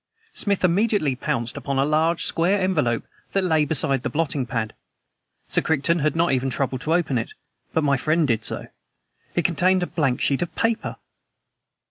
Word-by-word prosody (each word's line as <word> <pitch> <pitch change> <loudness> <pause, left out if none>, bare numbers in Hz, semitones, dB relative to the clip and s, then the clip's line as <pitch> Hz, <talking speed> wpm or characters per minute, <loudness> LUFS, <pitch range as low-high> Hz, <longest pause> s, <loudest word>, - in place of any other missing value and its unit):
Smith 200 -2 0
immediately 185 - +2
pounced 120 -2 -2
upon 140 -1 -3
a 135 - +3
large, 160 +3 +1
square 185 +5 +1
envelope 150 -11 +1 0.3
that 195 - +2
lay 160 -4 +3
beside 140 -3 +1
the - - -2
blotting 145 -4 -1
pad. 115 -3 -2 0.7
Sir - - +3
Crichton 160 +2 +1
had 150 0 +1
not 170 -1 +2
even 130 0 +1
troubled 130 +1 -2
to 160 +4 +1
open 150 -8 +1
it, 115 - -5 0.4
but 160 - +1
my 140 -2 +3
friend 155 +3 +1
did 115 -3 0
so. - - -1 0.7
It 175 - +1
contained 180 +2 +2
a - - +1
blank 135 -8 0
sheet 140 - +1
of 175 - -3
paper! 225 0 -1
155 Hz, 175 wpm, -23 LUFS, 135-175 Hz, 0.7 s, a